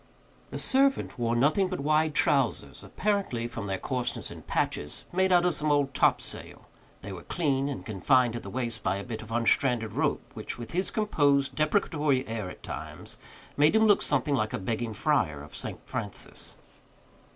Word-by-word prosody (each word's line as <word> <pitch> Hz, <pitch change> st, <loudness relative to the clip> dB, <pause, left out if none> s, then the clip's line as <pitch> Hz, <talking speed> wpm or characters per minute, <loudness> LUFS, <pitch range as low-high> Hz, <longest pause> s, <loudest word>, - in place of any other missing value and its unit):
The -, -, -5 dB
servant 270 Hz, -, +2 dB
wore 115 Hz, 0 st, +1 dB
nothing 150 Hz, +10 st, +3 dB
but 185 Hz, 0 st, -4 dB
wide 155 Hz, +1 st, +2 dB
trowsers, 135 Hz, -7 st, +1 dB
apparently, 195 Hz, -, -1 dB
from 115 Hz, -3 st, -6 dB
their 95 Hz, -1 st, -1 dB
coarseness 125 Hz, +3 st, -2 dB
and -, -, -11 dB
patches, 75 Hz, 0 st, -2 dB
made 190 Hz, +1 st, +2 dB
out 175 Hz, -1 st, +5 dB
of 180 Hz, -, +3 dB
some 150 Hz, 0 st, 0 dB
old 140 Hz, -2 st, +2 dB
topsail; -, -, 0 dB, 0.4 s
they 100 Hz, -, -7 dB
were 90 Hz, -, -8 dB
clean, 140 Hz, -, 0 dB
and 140 Hz, -, -5 dB
confined 120 Hz, +3 st, +2 dB
at 120 Hz, -, -4 dB
the 100 Hz, -, -8 dB
waist 120 Hz, -1 st, -3 dB
by 90 Hz, -, 0 dB
a 100 Hz, -, -4 dB
bit 115 Hz, -1 st, -6 dB
of 110 Hz, 0 st, -11 dB
unstranded 115 Hz, -1 st, +2 dB
rope, -, -, 0 dB
which, -, -, -6 dB
with 120 Hz, -1 st, -7 dB
his 185 Hz, +3 st, 0 dB
composed, 145 Hz, -10 st, +2 dB
deprecatory 155 Hz, -4 st, +1 dB
air 110 Hz, -4 st, -4 dB
at -, -, -12 dB
times, -, -, -7 dB, 0.4 s
made 150 Hz, +7 st, +4 dB
him 220 Hz, 0 st, +5 dB
look 205 Hz, -2 st, +5 dB
something 140 Hz, +1 st, +1 dB
like 110 Hz, -5 st, 0 dB
a -, -, 0 dB
begging 115 Hz, +3 st, -3 dB
friar 95 Hz, -, +1 dB
of 75 Hz, -, -12 dB
St. -, -, -3 dB
Francis. -, -, -3 dB
135 Hz, 180 wpm, -28 LUFS, 115-155 Hz, 0.4 s, out